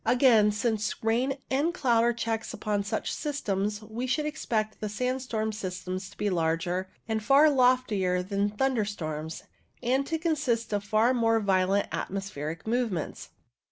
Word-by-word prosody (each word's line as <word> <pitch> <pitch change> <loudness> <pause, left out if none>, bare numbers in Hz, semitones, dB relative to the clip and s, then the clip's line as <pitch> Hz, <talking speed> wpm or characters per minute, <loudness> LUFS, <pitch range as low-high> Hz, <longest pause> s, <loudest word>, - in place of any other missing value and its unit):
Again, 240 -5 +5
since 210 0 -1
rain 245 +5 +1
and 300 +6 +1
cloud 240 -7 +3
are 240 - +4
checks 225 -1 -3
upon 205 -2 -1
such 215 +2 -2
systems, 210 -8 -2
we 225 +4 -4
should 300 +4 0
expect 225 -8 -2
the 210 - -3
sandstorm 245 -1 -2
systems 185 -2 -5
to - - -18
be 205 - 0
larger 175 +2 0 0.2
and 220 -1 -1
far 285 +7 +6
loftier 245 -9 +2
than 200 +2 0
thunderstorms, 205 - -2 0.4
and 265 +3 +1
to 325 - 0
consist 275 -9 0
of 205 -1 0
far 215 +4 +3
more 225 -2 +3
violent 195 -1 +2
atmospheric 165 -5 -4
movements. 225 -8 -2
220 Hz, 145 wpm, -28 LUFS, 200-250 Hz, 0.4 s, far